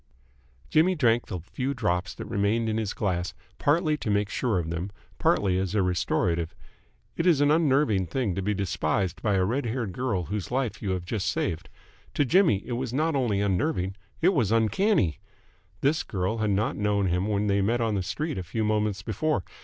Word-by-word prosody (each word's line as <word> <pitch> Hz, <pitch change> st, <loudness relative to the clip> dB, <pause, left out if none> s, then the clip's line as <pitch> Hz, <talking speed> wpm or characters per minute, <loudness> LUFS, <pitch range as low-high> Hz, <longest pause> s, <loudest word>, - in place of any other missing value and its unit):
Jimmy 175 Hz, +4 st, +4 dB
drank 120 Hz, -6 st, +2 dB
the 90 Hz, -, -4 dB
few 130 Hz, -, -3 dB
drops 90 Hz, -6 st, -1 dB
that -, -, -7 dB
remained 105 Hz, +3 st, 0 dB
in 110 Hz, 0 st, 0 dB
his 110 Hz, -3 st, -1 dB
glass, 90 Hz, -4 st, -2 dB, 0.2 s
partly 155 Hz, +1 st, +2 dB
to 115 Hz, -, -4 dB
make 105 Hz, 0 st, +1 dB
sure 115 Hz, -6 st, 0 dB
of 85 Hz, -2 st, -2 dB
them, 85 Hz, +3 st, -3 dB, 0.3 s
partly 95 Hz, -2 st, +2 dB
as 95 Hz, +2 st, -2 dB
a 100 Hz, -, +3 dB
restorative. 85 Hz, -2 st, 0 dB, 0.6 s
It 165 Hz, -, 0 dB
is 165 Hz, -6 st, +5 dB
an 145 Hz, 0 st, +4 dB
unnerving 140 Hz, -, +3 dB
thing 110 Hz, +1 st, -1 dB
to 95 Hz, -, -2 dB
be 105 Hz, +2 st, 0 dB
despised 95 Hz, -1 st, -1 dB
by 105 Hz, -3 st, +1 dB
a 95 Hz, -1 st, +2 dB
red 120 Hz, +5 st, -1 dB
haired 115 Hz, -3 st, -2 dB
girl 105 Hz, -4 st, -1 dB
whose 100 Hz, +4 st, -4 dB
life 125 Hz, -6 st, -2 dB
you 100 Hz, -, -3 dB
have 90 Hz, -2 st, -2 dB
just 100 Hz, 0 st, -2 dB
saved. 85 Hz, -4 st, -2 dB, 0.5 s
To 145 Hz, -, +3 dB
Jimmy 165 Hz, -, +3 dB
it -, -, -7 dB
was 125 Hz, 0 st, -2 dB
not 155 Hz, +4 st, +1 dB
only 115 Hz, -7 st, +1 dB
unnerving; 95 Hz, -, 0 dB, 0.3 s
it 180 Hz, -, +7 dB
was 120 Hz, -, +1 dB
uncanny. 115 Hz, -, +2 dB, 0.6 s
This 150 Hz, +4 st, +2 dB
girl 95 Hz, 0 st, -2 dB
had 110 Hz, -1 st, +1 dB
not 100 Hz, +2 st, +1 dB
known 105 Hz, -1 st, +1 dB
him 90 Hz, +2 st, 0 dB
when 105 Hz, -1 st, 0 dB
they 100 Hz, -1 st, +2 dB
met 115 Hz, +5 st, +1 dB
on 115 Hz, -2 st, 0 dB
the 100 Hz, -, 0 dB
street 105 Hz, -, -3 dB
a -, -, -4 dB
few 110 Hz, +6 st, -2 dB
moments 105 Hz, -2 st, 0 dB
before. 115 Hz, +2 st, -1 dB
105 Hz, 200 wpm, -27 LUFS, 95-130 Hz, 0.6 s, it